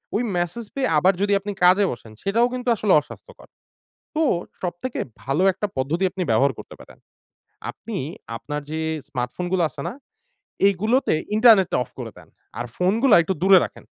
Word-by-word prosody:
ওই 225 - +1
মেসেজ 175 +7 -2
পেয়ে 275 -1 0
আবার 185 +5 +4
যদি 205 0 +2
আপনি 205 +1 -5
কাজে 185 +3 +6
বসেন 115 -2 -9
সেটাও 230 +5 +2
কিন্তু 250 0 -5
আসলে 205 -2 +2
অস্বাস্থ্যকর। 150 - -14 0.7
তো 320 - +2 0.4
সবথেকে 180 +8 -4 0.2
ভালো 135 +8 0
একটা 200 +3 -3
পদ্ধতি 150 +8 -1
আপনি 190 0 -4
ব্যবহার 140 0 +3
করতে - - -10
পারেন। - - -15 0.7
আপনি 220 0 -8 0.4
আপনার 150 +5 -5
যে 160 - -3 0.3
স্মার্টফোন 125 +7 -4
গুলো 185 -2 +2
আছে 150 - -9
না? - - -5 0.8
এইগুলোতে 215 +7 +1 0.2
ইন্টারনেটটা 220 -5 +5
অফ 125 - -22
করে 120 -3 -6
দেন। - - -16 0.3
আর 120 - -3
ফোনগুলা 215 +7 +3
একটু 190 +4 -2
দূরে 190 0 +7
রাখেন। - - -10
190 Hz, 165 wpm, -22 LUFS, 155-215 Hz, 0.8 s, দূরে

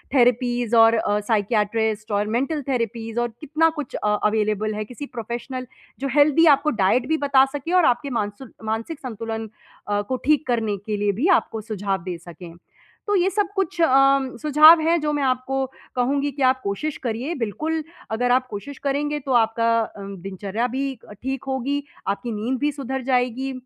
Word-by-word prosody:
Therapies 245 -1 +2
और 225 0 +7
अ, 210 -2 +1
psychiatrist 215 0 0
और 205 +1 +1
mental 290 +3 -1
therapies 230 -2 -2
और 240 - -1
कितना 310 +2 +2
कुछ 280 - -5
अ, - - -2 0.2
अवेलेबल 215 0 +1
है। 215 0 -3
किसी 250 +6 -8
प्रोफेशनल 245 +1 -6 0.3
जो 275 - -2
हेल्दी 300 +2 +5
आपको 300 +2 -1
डाइट 240 +7 +3
भी 315 +1 +1
बता 275 -2 +4
सके 290 +4 -4
और 360 -3 +5
आपके 245 +3 +1
मानसुक 225 +1 -4
मानसिक 225 +8 -3
संतुलन 225 -3 -5 0.4
अ, 205 0 0
को 255 +6 -3
ठीक 300 0 +2
करने 225 -4 0
के 215 -1 -2
लिए 205 0 +1
भी 325 - +3
आपको 220 -1 -8
सुझाव 200 -4 -3
दे 180 -1 -4
सकें। 170 0 -11 0.6
तो 410 - +2
ये 370 0 +3
सब 410 -1 +1
कुछ 385 -2 -2
अ, 325 - +6 0.5
सुझाव 310 +2 +7
है 330 +2 +3
जो 300 0 0
मैं 290 -1 0
आपको 265 +1 0 0.3
कहूँगी 275 +3 +1
कि 280 +1 -8
आप 260 0 +3
कोशिश 295 +10 -3
करिए। 245 +6 -2
बिल्कुल 310 +7 -2 0.3
अगर 245 +2 +1
आप 255 +1 +3
कोशिश 265 +7 -7
करेंगे 290 +1 -1
तो 275 -1 -5
आपका 230 0 +2
अ, 220 - -4
दिनचर्या 195 +3 -4
भी 265 +2 -3 0.3
ठीक 265 0 -3
होगी, 270 +2 -1 0.2
आपकी 205 +4 -2
नींद 225 +5 -2
भी 295 +1 +1
सुधर 265 -1 -4
जाएगी 255 +1 0
245 Hz, 180 wpm, -23 LUFS, 220-280 Hz, 0.6 s, और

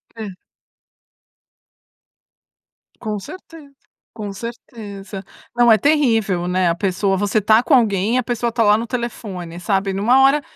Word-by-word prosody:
Hã. 220 -1 -6 2.7
Com 215 -3 -3
certeza, 325 - -12 0.4
com 210 -3 -6
certeza. 205 -3 -8 0.3
Não 240 -1 +5
é 220 - +7
terrível, 225 - +1
né, 180 0 +1
a 170 - 0
pessoa 195 +1 0
você 205 +2 0
está 215 +2 +4
com 275 - 0
alguém 215 -1 +2
e - - +3
a 255 - +1
pessoa 240 0 -1
está 230 0 0
lá 210 0 +5
no 230 +1 -4
telefone 195 -8 -5
sabe 195 +1 -1
numa 235 +7 +3
hora 280 +2 +4
215 Hz, 140 wpm, -19 LUFS, 195-240 Hz, 2.7 s, é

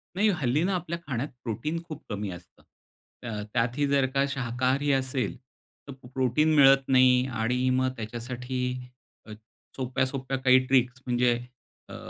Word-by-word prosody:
नाही, 210 +2 +3
हल्ली 150 -3 +1
ना 195 +1 +1
आपल्या 170 -1 -4
खाण्यात 135 +2 -2
प्रोटीन 150 +9 -3
खूप 155 -1 -8
कमी 105 -1 -3
असतं. 90 0 -13 0.6
त - - -9 0.3
त्यातही 125 +4 +1
जर 140 -1 +3
का 135 - +3
शाकाहारी 130 +2 0
असेल, 130 -4 -1 0.5
तर - - -7 0.2
प्रोटीन 135 +5 +2
मिळत 135 -1 +6
नाही. 130 -1 +5
आणि 125 +3 +1
मग 130 - +1
त्याच्यासाठी 125 +3 -5 0.7
अ, 110 - -12 0.4
सोप्या, 130 0 -1
सोप्या 135 0 -3
काही 130 0 +5
ट्रिक्स 130 -1 +2
म्हणजे 120 -1 +2 0.6
अ, - - -8
130 Hz, 145 wpm, -27 LUFS, 125-140 Hz, 0.7 s, मिळत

